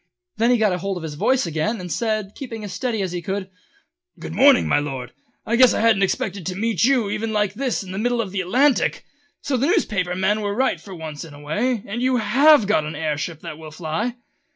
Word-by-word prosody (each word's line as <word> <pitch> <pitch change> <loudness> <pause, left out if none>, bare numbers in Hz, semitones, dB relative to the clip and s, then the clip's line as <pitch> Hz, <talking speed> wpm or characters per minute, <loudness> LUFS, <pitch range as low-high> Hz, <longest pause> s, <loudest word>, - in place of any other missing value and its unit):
Then 230 +2 +3
he 245 - +4
got 210 -5 +2
hold 195 +1 -3
of 170 - -7
his 155 -2 -5
voice 255 - +1
again 170 +8 -1
and 180 -1 -7
said, 215 -2 -1
keeping 230 -5 -7
as 200 -3 -6
steady 225 0 -2
as 185 - -3
he 175 -1 -4
could: 190 +2 -4 0.7
"Good - - -7
morning, 275 -1 +5
my - - +3
Lord! 130 -4 -5 0.3
Guess 235 +1 +5
I - - 0
never 200 -3 +1
expected 195 0 -1
to 185 - -3
meet 220 -2 0
even 225 -4 +1
you - - -3
like 210 -2 +1
this 250 -1 -2
in 185 - -9
the 190 - -4
middle 240 +2 0
of 210 -5 -2
the 195 -1 -1
Atlantic! 255 +9 +2 0.4
So 275 -2 0
the 265 +4 +1
newspaper 185 - 0
men 200 +3 +1
were 205 -1 -2
right 260 +3 +1
for 195 -2 -10
once 155 -3 -7
in 155 -3 -11
a - - -12
way, 210 +10 -1
and 220 +4 -4
you 255 0 +2
have 275 +3 +5
got 200 -6 +2
an 155 +1 -5
air 155 0 -1
ship 155 +2 -5
that 165 -2 -8
will 160 -1 -9
fly?" 170 +10 -3
205 Hz, 235 wpm, -22 LUFS, 175-235 Hz, 0.7 s, morning